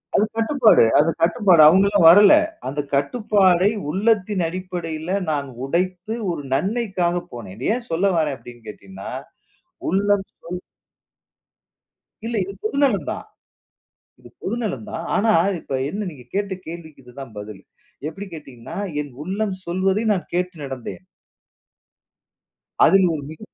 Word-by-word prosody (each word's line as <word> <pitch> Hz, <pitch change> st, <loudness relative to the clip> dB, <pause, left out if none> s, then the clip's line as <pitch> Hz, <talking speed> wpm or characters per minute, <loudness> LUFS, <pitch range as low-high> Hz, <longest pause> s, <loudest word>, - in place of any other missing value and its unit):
அது 210 Hz, -, +4 dB
கட்டுப்பாடு 230 Hz, -, +5 dB, 0.2 s
அது 155 Hz, -, +4 dB
கட்டுப்பாடு. 175 Hz, -1 st, +5 dB
அவங்கலாம் 195 Hz, +1 st, +4 dB
வரல. 200 Hz, +4 st, +8 dB, 0.3 s
அந்தக் 145 Hz, +1 st, -4 dB
கட்டுப்பாடை 190 Hz, -, +3 dB, 0.2 s
உள்ளத்தின் 205 Hz, +1 st, +1 dB
அடிப்படையில 175 Hz, -1 st, -4 dB
நான் 140 Hz, -2 st, -2 dB, 0.2 s
உடைத்து 180 Hz, +7 st, -2 dB, 0.2 s
ஒரு 155 Hz, -4 st, -5 dB
நன்மைக்காகப் 180 Hz, -, -1 dB
போனேன். 105 Hz, -6 st, -8 dB
இத 125 Hz, -, -2 dB
ஏன் 245 Hz, -1 st, -7 dB
சொல்ல 165 Hz, +4 st, +1 dB
வர்றேன் 150 Hz, -4 st, 0 dB
அப்டின்னு 120 Hz, -2 st, -14 dB
கேட்டீங்கன்னா, 95 Hz, -2 st, -9 dB, 0.8 s
உள்ளம் 200 Hz, +1 st, +1 dB
சொல் 180 Hz, +1 st, -7 dB, 1.7 s
இல்ல 235 Hz, 0 st, -3 dB
இது 195 Hz, +2 st, -7 dB
பொது 215 Hz, +6 st, -2 dB
நலம் 245 Hz, -8 st, +2 dB
தான். -, -, -6 dB, 0.9 s
இது -, -, -15 dB
பொது -, -, -2 dB
நலம் 210 Hz, 0 st, -3 dB
தான். 165 Hz, -, -4 dB
ஆனா, 220 Hz, +2 st, +3 dB, 0.3 s
இப்ப 135 Hz, -, -4 dB
என்ன 205 Hz, +4 st, -4 dB
நீங்கக் 125 Hz, -5 st, -16 dB
கேட்ட 200 Hz, -1 st, -1 dB
கேள்விக்கு 160 Hz, -4 st, -9 dB
இதுதான் 125 Hz, -1 st, -11 dB
பதில். 105 Hz, -1 st, -8 dB, 0.5 s
எப்டி 195 Hz, +5 st, -8 dB
கேட்டீங்கன்னா, 135 Hz, -7 st, -9 dB, 0.2 s
என் 145 Hz, -2 st, -8 dB
உள்ளம் 195 Hz, +2 st, -2 dB
சொல்வதை 190 Hz, +4 st, 0 dB
நான் 185 Hz, -, -3 dB
கேட்டு 180 Hz, 0 st, -1 dB
நடந்தேன். 135 Hz, +5 st, -7 dB, 1.8 s
அதில் 190 Hz, -1 st, +5 dB
ஒரு 145 Hz, -3 st, -4 dB
மிக 155 Hz, -, -10 dB
180 Hz, 130 wpm, -22 LUFS, 145-200 Hz, 1.8 s, வரல